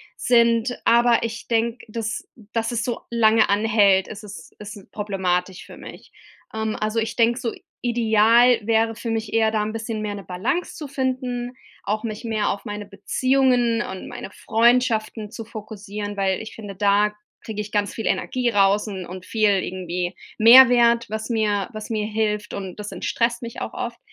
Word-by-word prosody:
sind, 235 0 +2
aber 235 0 +4
ich 230 0 -5
denke, 230 +1 -1
dass 220 0 -4 0.3
dass 225 0 -1
es 230 -1 -1
so 245 -2 -3
lange 225 -1 +4
anhält, 200 -2 +3
ist 215 0 -9
es 205 -1 -10
ist 205 -2 -10
problematisch 190 -3 -2
für - - -13
mich. - - -12 0.4
Ähm, 220 0 -2
also 215 +1 -1
ich 225 0 -3
denke 235 +1 +2
so 235 -3 -3 0.3
ideal 235 +1 +4
wäre 225 0 +2
für 230 +1 -5
mich 225 -1 -3
eher 220 -1 +3
da 215 -1 0
'n 215 - -3
bisschen 225 -1 -4
mehr 210 -1 -3
'ne 200 - -8
Balance 200 - -2
zu 300 - -7
finden, 255 -2 -3 0.3
auch 215 +1 -2
mich 215 -1 -5
mehr 220 -2 0
auf 200 - -4
meine 205 0 -5
Beziehungen 245 +3 +1
und 190 - -7
meine - - -8
Freundschaften 225 -1 +1
zu 230 -1 -7
fokussieren, 210 -2 -7
weil 190 -1 0
ich 220 - -9
finde, 205 -3 -8
da 205 +1 +2 0.3
kriege 215 -2 -5
ich 210 0 -8
ganz 205 -2 0
viel 225 - -5
Energie 250 -1 0
raus 205 -1 +3
un 190 -3 -5
und 185 +1 -9
viel 215 0 +2
irgendwie 180 0 -4 0.2
Mehrwert, 235 0 +7
was 220 +2 -4
mir 210 -4 0
was 215 0 -8
mir 215 -1 -1
hilft, 210 -1 -2
und 190 -2 -6
das 210 0 -6
entstresst 235 0 -1
mich 235 0 -7
auch - - -5
oft. 235 -1 -5
220 Hz, 175 wpm, -22 LUFS, 205-235 Hz, 0.4 s, Mehrwert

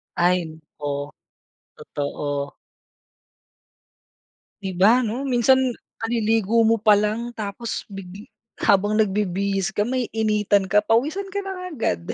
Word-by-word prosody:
Ay, 175 -3 +1 0.2
oh, 145 0 -3 0.7
totoo. 145 0 -4 2.1
Di 190 -1 -3
ba 225 +7 +5
ano, 245 +4 -3
minsan 260 0 +4 0.4
kaliligo 225 -1 +1
mo 230 0 +4
palang 215 +2 +2
tapos 215 +2 -5
big 195 +4 -10 0.3
habang 205 +2 +3
nagbibihis 200 0 0
ka, 205 - 0
maiinitan 215 -5 +1
ka, 210 0 +4
pawisan 300 - +1
ka 405 - -1
na 365 -2 -6
agad. 85 - -2
210 Hz, 105 wpm, -23 LUFS, 190-235 Hz, 2.1 s, ba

